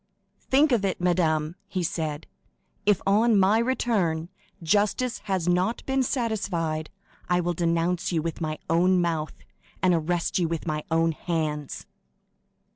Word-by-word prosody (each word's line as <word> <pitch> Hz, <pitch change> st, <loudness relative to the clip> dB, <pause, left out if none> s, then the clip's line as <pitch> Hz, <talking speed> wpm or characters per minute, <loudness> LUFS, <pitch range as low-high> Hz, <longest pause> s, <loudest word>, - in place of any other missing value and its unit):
"Think 285 Hz, +3 st, +4 dB
of 230 Hz, -5 st, +2 dB
it, 195 Hz, -2 st, -1 dB
madame," 165 Hz, -3 st, +1 dB
he 185 Hz, -2 st, -2 dB
said; 155 Hz, -2 st, -3 dB, 0.6 s
"if, 205 Hz, -3 st, +3 dB
on 210 Hz, +2 st, +4 dB
my 195 Hz, +4 st, +4 dB
return, 205 Hz, -10 st, 0 dB, 0.3 s
justice 210 Hz, +7 st, +1 dB
has 190 Hz, -4 st, -1 dB
not 180 Hz, +6 st, +1 dB
been 265 Hz, 0 st, +1 dB
satisfied, 195 Hz, -, -1 dB, 0.4 s
I 180 Hz, 0 st, +3 dB
will 175 Hz, 0 st, 0 dB
denounce 170 Hz, +1 st, 0 dB
you 160 Hz, -3 st, 0 dB
with 165 Hz, +1 st, -4 dB
my 155 Hz, -1 st, -2 dB
own 180 Hz, +3 st, +3 dB
mouth, 165 Hz, -3 st, -1 dB, 0.4 s
and 185 Hz, -1 st, +3 dB
arrest 170 Hz, +2 st, 0 dB
you 170 Hz, -, +1 dB
with 165 Hz, -1 st, -3 dB
my 155 Hz, -2 st, -2 dB
own 165 Hz, 0 st, +2 dB
hands!" 155 Hz, -3 st, -3 dB
175 Hz, 140 wpm, -26 LUFS, 160-200 Hz, 0.6 s, Think